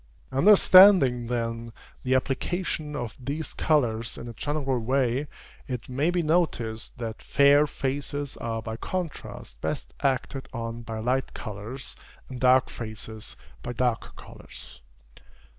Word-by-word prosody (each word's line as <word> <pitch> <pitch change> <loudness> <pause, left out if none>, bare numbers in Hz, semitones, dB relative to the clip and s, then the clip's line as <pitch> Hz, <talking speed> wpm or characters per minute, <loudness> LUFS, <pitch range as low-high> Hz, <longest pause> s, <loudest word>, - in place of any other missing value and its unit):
Understanding, 180 - +7
then, 115 -1 -3 0.3
the 130 0 +2
application 150 +3 -2
of 120 -6 -4
these 145 +5 -4
colors 115 -7 0
in 120 - -7
a 120 - -7
general 135 0 -1
way, 130 +3 0 0.4
it 125 -3 -5
may 140 +6 +1
be 175 -1 +1
noticed, 150 -9 0
that 115 -2 -5
fair 145 +1 +5
faces 140 +1 -3
are 115 -1 -3
by 110 0 -5
contrast 165 - -6
best - - -3
acted 135 0 -1
on 115 -1 -4
by 115 -1 -6
light 125 +4 -1
colors, 110 +5 -7 0.3
and 130 -1 -7
dark 130 0 +4
faces 110 -1 -7 0.2
by 120 - -5
darker 120 -1 0
colors. - - -13
130 Hz, 125 wpm, -26 LUFS, 115-145 Hz, 0.4 s, Understanding